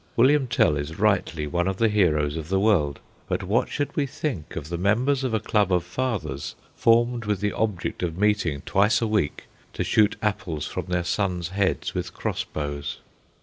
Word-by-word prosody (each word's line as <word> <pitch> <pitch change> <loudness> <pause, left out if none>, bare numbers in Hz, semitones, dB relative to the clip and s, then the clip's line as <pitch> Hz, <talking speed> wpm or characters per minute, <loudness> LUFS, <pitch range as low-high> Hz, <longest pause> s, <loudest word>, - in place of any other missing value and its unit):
William 135 +3 +4
Tell 75 -10 +3
is 75 +3 -5
rightly 95 -7 +1
one 85 +4 0
of 95 -1 -1
the 115 - +3
heroes 80 -8 +2
of 80 -1 -5
the 95 0 +2
world; 90 -9 +2 0.3
but - - -1
what - - +1
should 145 - -3
we 145 -2 +1
think 130 - -4
of 75 -2 -5
the 85 - -2
members 125 +8 +2
of 130 - 0
a 110 - +1
club 105 -2 +1
of 90 -2 +2
fathers, 105 - -3 0.2
formed 120 0 +3
with 105 -2 0
the 105 +1 -1
object 105 -5 -2
of 85 -2 -2
meeting 100 -8 +1
twice 105 +4 +3
a 115 - 0
week 105 -9 0 0.3
to - - -2
shoot 110 0 +3
apples 100 -8 -2
from - - -5
their 90 -1 0
sons' 90 -2 -1
heads 95 0 0
with - - -4
cross - - -2
bows? 75 -1 -4
100 Hz, 190 wpm, -25 LUFS, 80-110 Hz, 0.3 s, William